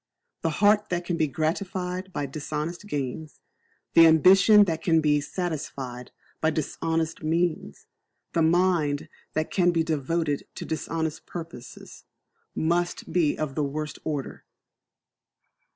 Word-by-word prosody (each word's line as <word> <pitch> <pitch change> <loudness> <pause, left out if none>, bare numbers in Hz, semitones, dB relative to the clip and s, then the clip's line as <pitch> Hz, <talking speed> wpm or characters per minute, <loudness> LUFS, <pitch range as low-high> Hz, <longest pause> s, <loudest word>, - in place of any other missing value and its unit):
The 165 - +1 0.2
heart 210 0 +4
that 175 -1 -2
can 175 - -1
be 160 -2 +1
gratified 180 +5 -3
by 145 -5 -2
dishonest 155 +6 -5
gains; 145 -1 -4 0.5
the 165 0 +8
ambition 195 +6 +7
that 165 -4 -2
can 165 -2 +3
be 150 -1 +2
satisfied 145 -7 -5 0.3
by 160 - +3
dishonest 160 +1 -2
means; 160 - -1 0.5
the 165 - +2
mind 165 -3 +2 0.2
that 155 +1 -1
can 180 -2 +3
be 165 -2 +2
devoted 155 -1 -1
to - - -6
dishonest 160 0 -3
purposes, 165 -8 -9 0.5
must 175 +2 -1
be 165 -5 +2
of 155 -3 -3
the 150 - -1
worst 150 +1 -4
order. 145 -4 -4
160 Hz, 125 wpm, -26 LUFS, 150-175 Hz, 0.5 s, the